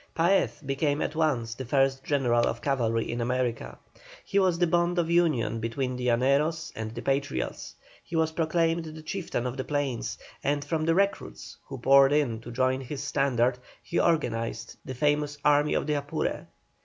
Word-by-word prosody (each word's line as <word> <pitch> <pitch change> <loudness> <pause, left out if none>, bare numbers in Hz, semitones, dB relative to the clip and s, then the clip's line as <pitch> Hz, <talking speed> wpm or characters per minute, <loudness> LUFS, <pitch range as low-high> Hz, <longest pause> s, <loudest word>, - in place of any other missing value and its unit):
Paez 170 -1 +2
became 145 +2 0
at - - -2
once 135 -8 0
the 130 - -6
first 135 +1 +1
general 120 -5 +2
of 120 - -2
cavalry 115 -4 0
in 120 0 -3
America. 125 0 -2 0.5
He 200 - +1
was 185 -3 +2
the 175 - +3
bond 175 +1 +1
of 170 -1 +1
union 155 -10 +2
between 125 +3 -2
the 125 0 -3
Llaneros 140 +7 +1
and 110 -1 -4
the 120 - -6
Patriots. 135 - -2 0.3
He 170 - -7
was 160 -1 +2
proclaimed 165 +1 0
the 155 0 -9
chieftain 160 -7 -3
of 125 +1 -3
the 130 - -2
plains, 145 -5 -2 0.3
and 145 0 0
from 155 +1 -1
the 165 0 +2
recruits 200 +1 -1
who 135 - -6
poured 135 +2 +5
in 135 -7 +1
to 120 - -9
join 130 +2 +1
his 135 +2 -5
standard 130 -3 +1 0.2
he 175 - -1
organized 115 -8 0
the 130 - -6
famous 145 +1 +1
Army 150 0 +4
of - - 0
the 150 - 0
Apure. 145 0 -2
140 Hz, 180 wpm, -27 LUFS, 125-160 Hz, 0.5 s, poured